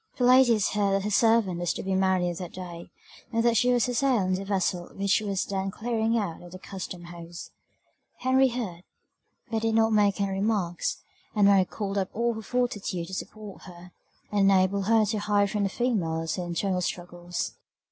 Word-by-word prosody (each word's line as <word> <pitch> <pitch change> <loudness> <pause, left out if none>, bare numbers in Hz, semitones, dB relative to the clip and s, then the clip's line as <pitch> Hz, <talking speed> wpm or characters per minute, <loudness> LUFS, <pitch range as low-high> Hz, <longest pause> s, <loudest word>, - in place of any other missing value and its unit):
The 250 - 0
ladies 245 -4 +5
heard 200 -2 +1
that 195 0 +1
her 210 - -2
servant 225 -5 +3
was 175 -1 0
to - - -6
be 190 - -1
married 185 -2 +1
that 180 -3 -7
day, 175 -2 -8 0.4
and 230 -1 +1
that 235 -1 +3
she 245 +2 +3
was 245 -2 +3
to 250 - -2
sail 245 -4 +2
in 185 0 0
the 190 +1 -2
vessel 185 -3 -1
which 200 +1 +2
was 200 -3 -1
then 195 -1 -2
clearing 225 +2 -1
out 195 -7 -3
at 175 0 -12
the - - -7
Custom 185 -2 -7
house. 170 0 -9 0.7
Henry 260 +1 +3
heard, 225 -9 -4 0.7
but 225 -1 0
did 225 0 +1
not 225 0 +3
make 205 -1 +3
any 200 -1 0
remarks; 195 -3 -1 0.3
and 205 -1 +4
Mary 195 -2 +5
called 200 0 -3
up 190 - -2
all 235 +1 +1
her 220 - -6
fortitude 210 -7 -2
to - - -9
support 210 +1 -7
her, 180 -1 -12 0.4
and 200 -1 +4
enable 195 +1 +3
her 220 +2 +3
to 210 +1 -1
hide 205 -1 +1
from 210 - -1
the - - 0
females 165 -9 -1
her 180 - -4
internal 180 +2 -1
struggles. 175 0 -4
200 Hz, 200 wpm, -27 LUFS, 180-225 Hz, 0.7 s, ladies